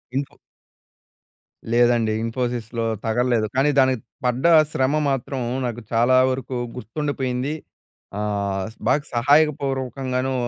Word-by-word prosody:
Info 140 +1 -3 1.4
లేదండి 120 -2 +3
ఇన్ఫోసిస్‌లొ 115 -1 -2 0.2
తగల్లేదు. 120 0 +1
కానీ 135 +3 +3
దానికి 130 -3 +3 0.2
పడ్డ 125 +1 0 0.3
శ్రమ 130 0 +1 0.2
మాత్రం 135 0 -2 0.2
నాకు 120 -1 -4
చాలా 120 +2 +3 0.2
వరకు 130 0 -4 0.2
గుర్తుండిపోయింది. 130 +2 -3 0.7
ఆహ్, 100 -2 -2 0.2
బాగా 145 +3 +2
సహాయక 145 +6 +5
పూర్వకంగాను. 130 -1 -2
125 Hz, 95 wpm, -22 LUFS, 115-135 Hz, 1.4 s, సహాయక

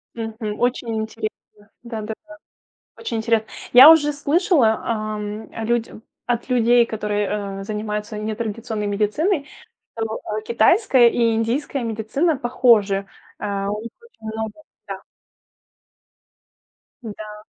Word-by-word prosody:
Мгм. 225 -2 -5
Очень 245 -2 0
интересно. 220 0 -4 0.5
Да, 230 -2 -5
да, 215 +1 -4
да. 310 - -11 0.6
Очень 230 - -4
интере 220 0 +1 0.3
Я 260 +5 +11
уже 295 -2 +5
слышала, 290 - +2
ам, 215 -2 -4 0.2
людь 235 0 0 0.4
от 240 +1 -2
людей, 240 -1 +4
которые, 205 -2 -3
э, - - -6
занимаются 210 0 -4
нетрадиционной 215 0 -3
медициной, 280 - 0 0.5
что, 225 -1 -3 0.2
э, - - -10
китайская 240 - +4
и 230 -1 +2
индийская 245 +4 -1
медицина 230 +8 0
похожи. 220 -6 +2 0.3
Э, 200 -1 -2
у 210 +1 -3
них 230 - -7
очень 470 - -18
много 220 -1 -4 0.3
Да. - - -7 2.0
Да. 210 -1 -8
225 Hz, 115 wpm, -21 LUFS, 210-245 Hz, 2.0 s, Я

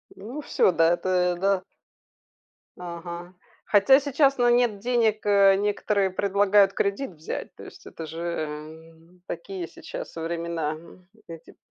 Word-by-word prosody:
Ну 240 +10 -7
всё, 240 - +2
да, 165 -1 +3
это, 185 - -3 0.3
ль - - -11
да. 195 0 +1 1.1
Ага, 175 0 -8 0.3
хотя 265 +7 +5
сейчас, 275 -1 +2
ну, 240 0 +3
нет 240 -4 +2
денег, 225 -2 +1
э, 200 -1 +5
некоторые 200 -1 0
предлагают 200 +1 +3
кредит 200 +6 -1
взять, 160 -1 -7
то - - -12
есть - - -13
это 165 - -8
же, 160 +1 -8
м, 160 +1 -7
такие 175 +1 -6
сейчас - - -9
времена, 165 -1 -3
м, 170 +3 -14 0.2
кредит 165 -1 -12
185 Hz, 140 wpm, -25 LUFS, 170-205 Hz, 1.1 s, хотя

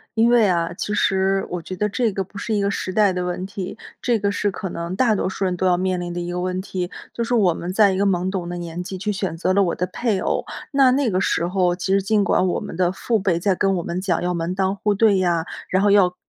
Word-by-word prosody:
因 225 +1 +4
为 230 -3 +5
啊， 170 -2 0
其 210 - -4
实 195 -1 +1
我 180 -1 -3
觉 185 - -7
得 210 +3 0
这 235 +1 0
个 195 0 -2
不 200 +2 -11
是 220 +1 -2
一 205 - +1
个 200 0 +1
时 185 - -3
代 200 0 +3
的 180 0 -2
问 180 +1 -3
题， 195 +1 -6 0.2
这 240 -2 +2
个 200 -1 0
是 205 0 0
可 195 0 -5
能 170 +1 -4
大 235 +1 +3
多 190 - 0
数 190 +1 -2
人， 180 -1 0
都 185 +1 0
要 180 -1 +3
面 185 -1 0
临 175 0 -4
的 175 - -4
一 175 0 -4
个 180 - -3
问 185 0 -2
题。 185 -2 -4 0.2
就 235 - -2
是 245 +1 0
我 190 -7 +4
们 175 +2 -5
在 200 0 +4
一 190 - -1
个 200 - +2
懵 185 -1 +1
懂 175 -3 -3
的 175 - -4
年 175 0 -5
纪， 190 +1 -6
去 210 +3 -2
选 190 -4 -3
择 185 +2 +1
了 200 - +4
我 180 -3 +1
的 180 - -1
配 210 +1 -1
偶， - - 0 0.3
那 275 -2 +5
那 270 +1 +2
个 185 0 +1
时 170 - +1
候， 180 -1 +1
其 190 +2 -1
实 195 - +3
尽 205 +1 +2
管 185 -2 +2
我 180 - 0
们 - - -7
的 180 0 +2
父 220 +4 -1
辈 185 -3 +1
在 195 +2 +2
跟 195 +1 +1
我 175 - -2
们 175 +2 -3
讲 185 -3 0
要 180 0 0
门 170 +1 -2
当 190 0 0
户 205 +1 0
对 205 -1 +4
呀， 170 -3 +1 0.2
然 190 +1 +2
后 205 - +4
要 185 -3 +4
190 Hz, 315 characters per minute, -22 LUFS, 180-200 Hz, 0.3 s, 为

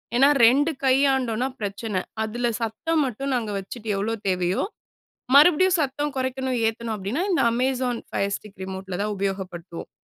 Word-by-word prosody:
ஏன்னா, 275 +3 +6 0.2
2 285 +7 +4
கையாண்டோம்ன்னா 260 -2 +2
பிரச்சனை. 205 -1 -3 0.2
அதுல 240 +3 -2
சத்தம் 300 +8 0
மட்டும் 270 +3 -3
நாங்க 220 -4 -2
வச்சுட்டு, 220 +3 -9
எவ்வளோ 220 +3 -1
தேவையோ, 180 0 +1 0.7
மறுபடியும் 355 +4 +6
சத்தம் 290 +1 -1
கொறைக்கணும், 260 -1 -1
ஏத்தணும் 225 0 -3
அப்படீன்னா, 210 - -2
இந்த 340 - +2
அமேசான் 250 0 0
ஃபயர் 200 0 -1
ஸ்டிக் 210 -2 -16
ரிமோட்ல 190 -1 -5
தான் 210 0 -2
உபயோகப்படுத்துவோம். 190 -3 -5
235 Hz, 140 wpm, -24 LUFS, 200-270 Hz, 0.7 s, ஏன்னா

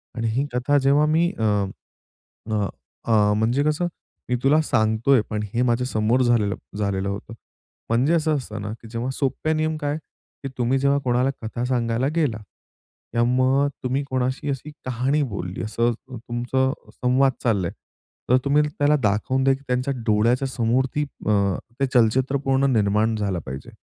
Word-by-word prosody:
आणि 115 -1 -1
ही 130 +6 0
कथा 135 +4 +2
जेव्हा 140 +2 +4
मी 165 +3 +2
अ, - - 0 1.1
अ, 105 -2 +1 0.4
अ, 105 -2 +3
म्हणजे 120 +6 +2
कसं? 155 +3 +1 0.4
"मी 125 - +2
तुला 150 +3 +5
सांगतो 110 -1 +1
आहे, 130 -5 +6
पण 105 -1 -2
हे 120 - +1
माझ्या 125 0 +1
समोर 115 +2 +1
झालेलं 110 -5 +2 0.2
झालेलं 100 -1 -1
होतं." 100 +3 -6 0.6
म्हणजे 125 +8 +2
असं 155 -2 +2
असतं 110 -5 -6
ना, 105 +1 -4
की 115 - -11
जेव्हा 120 +2 -3
सोप्या 150 +4 -1
नियम 155 0 0
काय? 145 0 -2
की 140 -2 -12
तुम्ही 125 +2 +1
जेव्हा 140 +1 +3
कोणाला 125 +1 +2
कथा 120 +2 -3
सांगायला 120 0 0
गेला 145 -10 +1 0.8
किंवा 120 0 +2
मग 135 +2 +3 0.2
तुम्ही 130 +3 0
कोणाशी 130 +2 -1
अशी 140 +2 -4
कहाणी 130 +4 0
बोलली 90 -1 -4
असं 115 +2 +1 0.2
तुमचं 125 +3 -1 0.2
संवाद 130 +2 +2
चालला 100 -7 +1
आहे. - - -6 0.6
तर 125 - +6
तुम्ही 145 +2 +4
त्याला 145 0 +2
दाखवून 110 +6 +1
द्या 135 0 +4
की 140 - -15
त्यांच्या 125 +2 0
डोळ्याच्यासमोर 120 +3 +2
ती 150 - +1 0.2
अ, - - +3 0.5
ते 135 - +3
चलचित्र 130 +4 +3
पूर्ण 135 0 +2
निर्माण 105 +1 +2
झालं 100 -4 -1
पाहिजे. 65 +1 -7
125 Hz, 165 wpm, -23 LUFS, 110-140 Hz, 1.1 s, आहे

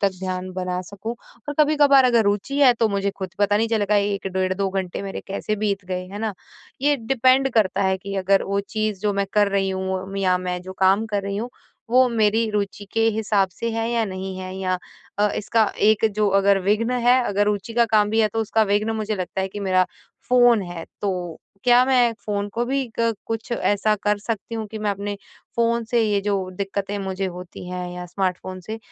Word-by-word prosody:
तक 200 - +3
ध्यान 185 0 -3
बना 180 0 -2
सकूँ। 205 +4 -5 0.3
और 290 - -2
कभी-कभार 290 -3 +5
अगर 240 -2 +4
रुचि 205 +8 0
है 265 -3 +7
तो 225 -1 +2
मुझे 200 -1 0
ख़ुद 190 -2 -4
पता 205 0 +3
नहीं 225 +1 +1
चलेगा 210 -2 +1
1 200 -1 0
डेढ़ 185 0 0
2 195 0 -1
घंटे 190 -1 -3
मेरे 195 -1 -5
कैसे 210 +2 -2
बीत 200 -2 -1
गए, 180 0 -3
है 200 +2 -7
ना? 220 -2 -2 0.5
ये 290 +1 +3
डिपेंड 260 +2 +3
करता 200 -3 +2
है 190 0 +2
कि 200 +1 -6
अगर 195 0 +3
वो 200 +1 0
चीज़ 215 -3 -2
जो 210 0 +1
मैं 200 0 0
कर 205 -1 +4
रही 195 -1 +1
हूँ 190 0 -3
या 185 -2 +3
मैं 180 0 -3
जो 185 - -8
काम 195 +4 +3
कर 205 -2 -2
रही 200 0 -3
हूँ 235 +4 -4 0.4
वो 255 +1 +5
मेरी 225 -1 +2
रुचि 205 -1 -2
के 225 - 0
हिसाब 210 -3 +1
से 230 +6 -3
है 225 0 -1
या 235 -1 +1
नहीं 190 -1 -5
है। 185 0 -6
या 185 -1 -1 0.4
अ, 210 - +4
इसका 220 +2 +2 0.2
एक 215 +1 +4
जो 210 0 +2
अगर 200 0 +4
विघ्न 215 +4 +1 0.2
है 250 +1 +6
अगर 205 -1 +1
रुचि 205 +1 -1
का 235 - +5
काम 210 -2 +3
भी 220 +1 +2
है 215 - +3
तो 225 - +1
उसका 220 0 +2
विघ्न 210 +2 +2
मुझे 215 0 -2
लगता 185 0 -3
है 190 - -1
कि 205 +2 -7
मेरा 185 -2 +3 0.4
फ़ोन 245 -4 +5
है। 175 -2 -7 0.2
तो 200 - 0 0.5
क्या 245 0 +6
मैं 250 -3 +3
फ़ोन 205 -1 -1
को 235 +1 0
भी 270 0 0
क 230 0 +2
कुछ 225 +1 -4
ऐसा 210 -2 +1
कर 210 0 +2
सकती 225 +1 -4
हूँ 220 -1 -3
कि 220 - -7
मैं 210 -1 0
अपने 200 +1 -4 0.4
फ़ोन 235 0 +1
से 235 -2 +3
ये 205 -2 +1
जो 195 -2 -1
दिक्कतें 200 +1 -3
मुझे 190 0 -3
होती 180 0 -8
हैं 180 0 -4
या 180 0 -6
स्मार्टफ़ोन 185 0 -3
से 215 +5 -6
205 Hz, 220 wpm, -23 LUFS, 190-225 Hz, 0.5 s, है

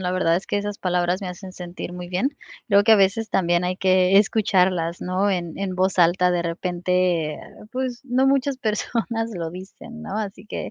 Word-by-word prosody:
La 180 -1 -1
verdad 170 -2 +2
es 190 - -5
que - - -1
esas 205 0 -3
palabras 180 +1 0
me 190 - -5
hacen 185 +1 -8
sentir 175 0 -7
muy 180 0 -7
bien, 185 +10 0 0.4
creo 200 -1 +5
que 225 - +6
a - - +8
veces 205 +3 +2
también 175 -1 +1
hay 180 +1 -1
que 185 0 +3
escucharlas, 185 -5 +2
¿no?, 185 +3 0
en 175 -3 -3
en 195 -2 -3
voz 185 0 0
alta. 180 +1 +4
De 175 - +1
repente, 175 -2 0 0.3
pues, 255 -1 -3
no 260 +1 +2
muchas 275 0 +2
personas 225 0 -2
lo 165 -1 -4
dicen, 195 +6 -10
¿no? 210 -2 -5
Así 205 -1 -5
que, - - -5
185 Hz, 195 wpm, -23 LUFS, 180-210 Hz, 0.4 s, a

